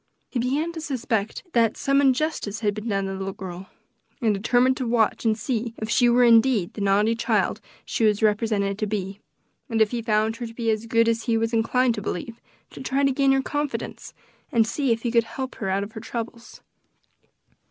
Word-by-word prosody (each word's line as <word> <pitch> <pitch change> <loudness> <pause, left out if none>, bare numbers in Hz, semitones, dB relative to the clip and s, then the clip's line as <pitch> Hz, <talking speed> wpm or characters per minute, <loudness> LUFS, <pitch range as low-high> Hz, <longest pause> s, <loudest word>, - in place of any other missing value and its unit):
He 250 - -1
began 280 +7 0
to 330 -1 -7
suspect 230 -7 -2
that 230 -2 +2
some 275 0 +2
injustice 265 -6 0
had 205 -2 +1
been 215 +2 -6
done 195 -1 0
the 195 - -3
little 195 0 -4
girl, 190 -2 -8 0.5
and 225 -5 +2
determined 245 +6 +2
to 255 - -2
watch 230 -1 +1
and 220 -1 +2
see 230 0 -3
if 215 0 -4
she 245 +1 +4
were 245 +1 +4
indeed 230 -5 +4
the 210 - -6
naughty 200 +3 +3
child 230 - 0 0.2
she - - -2
was 215 0 +2
represented 210 -2 +1
to 215 - -1
be, 200 -1 -4 0.5
and 225 -2 0
if 220 -1 +3
he 240 -1 -2
found 220 0 +1
her 240 - -5
as 225 -1 -1
good 230 0 +3
as 230 -1 0
he 230 -2 +2
was 225 +1 -1
inclined 240 +2 +2
to 210 - -5
believe, 225 +4 -5 0.3
to - - -10
try 270 +1 0
to 275 - +4
gain 275 +1 +3
her 270 0 +2
confidence, 290 0 -4 0.4
and 230 -2 +4
see 270 +3 -1
if 230 0 0
he 240 - 0
could 230 -1 +3
help 260 +2 -5
her 195 - -3
out 195 +1 0
of 200 - -8
her 220 - -8
troubles. 235 +1 -7
230 Hz, 205 wpm, -24 LUFS, 210-250 Hz, 0.5 s, she